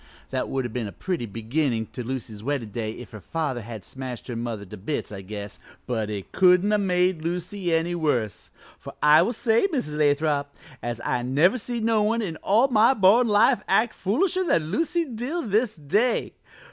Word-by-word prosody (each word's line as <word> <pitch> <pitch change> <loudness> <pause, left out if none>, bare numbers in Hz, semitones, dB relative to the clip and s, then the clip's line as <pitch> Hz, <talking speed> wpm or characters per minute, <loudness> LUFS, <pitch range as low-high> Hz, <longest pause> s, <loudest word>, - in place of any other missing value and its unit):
That - - -2
would 135 -1 -1
have 120 - -5
been 120 -4 -2
a - - -7
pretty 175 - -3
beginnin' 115 +2 -1
to 125 - -5
Lucy's 115 -4 -5
weddin' 125 -3 -3
day 110 0 -3
if 125 - -11
her 105 - -9
father 145 - -3
had 110 -4 -8
smashed 130 -3 -7
her 120 - -3
mother 115 -3 -4
to 100 - -10
bits, 110 +8 -4
I 100 -2 -6
guess, 100 +1 -7 0.3
but 110 -4 -2
it 100 -3 -6
couldn't 180 +2 +4
have 210 -1 +2
made 180 -3 +1
Lucy 175 +2 -3
any 165 +1 +1
worse; 125 - -1 0.3
for - - -10
I 150 +2 +7
will 190 - +1
say, 230 - +2
Mrs. 250 - -3
Lathrop, 145 -1 +1 0.3
as 120 -1 -4
I 125 - 0
never 150 - +3
see 240 +2 -3
no 225 -1 +2
one 225 +2 +1
in 165 -6 -4
all 225 +7 +3
my 230 +2 +5
born 220 +4 +5
life 215 +4 +4
act 220 0 +2
foolisher 370 - 0
than 165 - +1
Lucy 330 - 0
Dill 265 +7 -4
this 215 +1 +1
day. 205 - 0
160 Hz, 195 wpm, -25 LUFS, -, 0.3 s, I